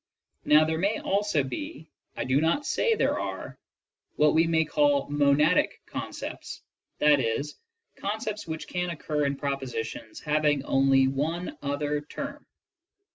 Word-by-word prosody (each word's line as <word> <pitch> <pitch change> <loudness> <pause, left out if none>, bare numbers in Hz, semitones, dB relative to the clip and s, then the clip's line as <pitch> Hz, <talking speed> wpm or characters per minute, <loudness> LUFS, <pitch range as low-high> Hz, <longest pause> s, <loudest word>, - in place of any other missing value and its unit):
Now 150 +1 +6
there 160 0 -1
may 200 +4 +1
also 200 -6 +1
be 295 - -6 0.3
ŌĆö - - -1
^I - - -6
do 130 +3 +3
not 170 - +1
say 460 - +2
there - - +1
are - - -4
ŌĆö - - -13 0.6
^what 150 0 +4
we 165 +1 +4
may 160 -1 +2
call 285 - +2
monadic 145 +3 +3
concepts, - - -6 0.4
i. 150 -1 +6
e., 115 0 0 0.5
concepts 210 0 -4
which 160 -1 -5
can 180 0 -2
occur 150 -3 -1
in 140 - -1
propositions 135 -5 -4
having 150 -2 +1
only 135 0 +4
one 155 +7 -2
other 145 +1 -1
term. 285 - -7
150 Hz, 145 wpm, -27 LUFS, 140-180 Hz, 0.6 s, Now